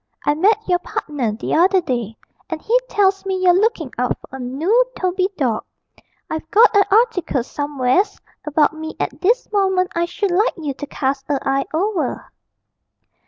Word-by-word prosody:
'I 290 Hz, -, +3 dB
met 415 Hz, +8 st, +2 dB
your 355 Hz, -1 st, +2 dB
partner 280 Hz, -10 st, -3 dB
the 220 Hz, -, -4 dB
other 370 Hz, +4 st, +4 dB
day, 240 Hz, -, -3 dB, 0.3 s
and 325 Hz, -, -3 dB
he 450 Hz, +9 st, 0 dB
tells 390 Hz, -1 st, +2 dB
me 385 Hz, -1 st, -2 dB
you're 365 Hz, -1 st, +5 dB
looking 370 Hz, -, +1 dB
out 250 Hz, 0 st, 0 dB
for 265 Hz, -, -10 dB
a -, -, -11 dB
noo 315 Hz, -, +2 dB
Toby 370 Hz, +1 st, 0 dB
dawg. 240 Hz, -7 st, 0 dB, 0.6 s
I've 315 Hz, 0 st, -5 dB
got 440 Hz, +3 st, +5 dB
a 400 Hz, -, +6 dB
article 405 Hz, -, +2 dB
somewheres 290 Hz, -, 0 dB, 0.2 s
about 300 Hz, 0 st, +2 dB
me 315 Hz, 0 st, -7 dB
at 290 Hz, -, -3 dB
this 465 Hz, +7 st, +1 dB
moment 380 Hz, -3 st, +1 dB
I 340 Hz, 0 st, +1 dB
should 390 Hz, +2 st, -2 dB
like 410 Hz, +7 st, +2 dB
you 300 Hz, -4 st, -3 dB
to 290 Hz, +2 st, -8 dB
cast 270 Hz, 0 st, -3 dB
a 285 Hz, -, +2 dB
eye 270 Hz, 0 st, +1 dB
over.' 365 Hz, +2 st, -2 dB
335 Hz, 170 wpm, -20 LUFS, 280-390 Hz, 0.6 s, a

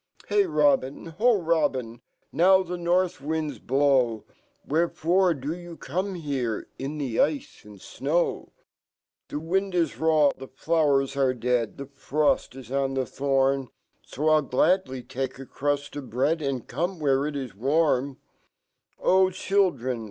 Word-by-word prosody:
Hey, 405 Hz, -2 st, +3 dB
Robin! 275 Hz, -, +1 dB
ho, 235 Hz, -2 st, +4 dB
Robin! 130 Hz, -8 st, 0 dB, 0.3 s
NOW 190 Hz, +3 st, +5 dB
fhe 180 Hz, 0 st, -5 dB
north 175 Hz, -2 st, +1 dB
wind 155 Hz, +1 st, -2 dB
j -, -, -15 dB
blow; 130 Hz, -4 st, +2 dB, 0.4 s
\Vherefore 170 Hz, +3 st, +2 dB
do 145 Hz, +5 st, -3 dB
you 175 Hz, -1 st, -9 dB
come 185 Hz, +7 st, -3 dB
here 135 Hz, -9 st, -3 dB
In 140 Hz, +3 st, -4 dB
fho 130 Hz, -6 st, 0 dB
ice 150 Hz, -2 st, -4 dB
and 105 Hz, -1 st, -13 dB
jnow? 150 Hz, -, -2 dB, 0.3 s
" -, -, -68 dB
" -, -, -66 dB
The 145 Hz, -, -3 dB
wind 190 Hz, +4 st, -1 dB
ij 170 Hz, -2 st, 0 dB
raw, 155 Hz, -3 st, +4 dB
fhe 135 Hz, 0 st, -11 dB
flowers 145 Hz, -5 st, +1 dB
are 135 Hz, -2 st, +2 dB
dead 120 Hz, -1 st, -1 dB
The 140 Hz, -, -6 dB
fpofl 140 Hz, +2 st, 0 dB
15 125 Hz, +3 st, -6 dB
on 135 Hz, -1 st, 0 dB
fhe 130 Hz, -2 st, -4 dB
fhopn, 135 Hz, -1 st, +1 dB, 0.5 s
il 155 Hz, +1 st, +4 dB
gladly 130 Hz, -2 st, +1 dB
take 130 Hz, +1 st, -4 dB
a 135 Hz, -, -9 dB
crust 145 Hz, +2 st, -2 dB
f 145 Hz, -2 st, -5 dB
bread, 140 Hz, +7 st, 0 dB
And 135 Hz, -4 st, -3 dB
come 180 Hz, +2 st, -2 dB
who 145 Hz, -4 st, +2 dB
re 145 Hz, +2 st, -1 dB
it 150 Hz, -, -7 dB
is 130 Hz, -4 st, -5 dB
warm 140 Hz, +2 st, +1 dB, 0.4 s
" -, -, -49 dB
Oh, 190 Hz, 0 st, +4 dB
Children! 180 Hz, -10 st, 0 dB
145 Hz, 160 wpm, -26 LUFS, 135-170 Hz, 0.5 s, NOW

